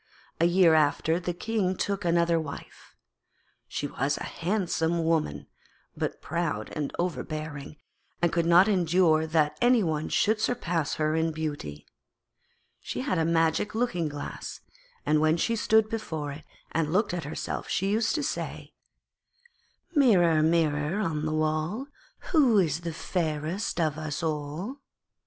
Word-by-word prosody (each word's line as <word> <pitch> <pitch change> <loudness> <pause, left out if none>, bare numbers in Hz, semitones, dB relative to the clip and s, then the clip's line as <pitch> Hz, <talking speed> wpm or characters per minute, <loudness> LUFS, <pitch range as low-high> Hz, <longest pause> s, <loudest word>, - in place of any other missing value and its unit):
A 165 - +4
year 175 -1 +5
after 155 +2 +2
the 180 0 -2
King 190 +1 -1
took 200 +2 -2
another 170 -1 +2
wife. 155 -3 -9 0.7
She - - -3
was 140 0 -1
a - - -5
handsome 170 -3 -1
woman, 155 - 0 0.5
but - - -4
proud 155 -10 -2
and 150 -2 -2
overbearing, 155 -4 -4 0.4
and 175 0 +1
could 170 -1 +1
not 175 +3 +7
endure 175 -4 +3
that 155 -2 +1
any 245 -2 +5
one 155 -2 -1
should 215 +1 +2
surpass 170 -11 -1
her 155 0 0
in 160 0 +1
beauty. 145 - -5 0.9
She 125 - -5
had 170 +6 0
a 160 - +2
magic 165 +5 +1
looking 180 -9 0
glass, 145 0 -7 0.4
and 150 0 +3
when 155 +1 +3
she 230 +7 +1
stood 220 0 +3
before 160 -10 -4
it 145 +2 -10 0.3
and 155 -1 0
looked 185 +1 +1
at 170 -4 -3
herself 150 - -4
she 195 +1 0
used 220 +5 +1
to 300 - -1
say: - - -4 1.2
'Mirror, 180 - +5
Mirror 155 +2 +1
on 155 -6 -1
the - - -1
wall, 155 - -1 0.5
Who 270 - +5
is 165 -5 +2
fairest 170 +1 -2
of 155 -2 0
us 155 +2 -4
all?' 155 - -3
165 Hz, 140 wpm, -27 LUFS, 155-185 Hz, 1.2 s, not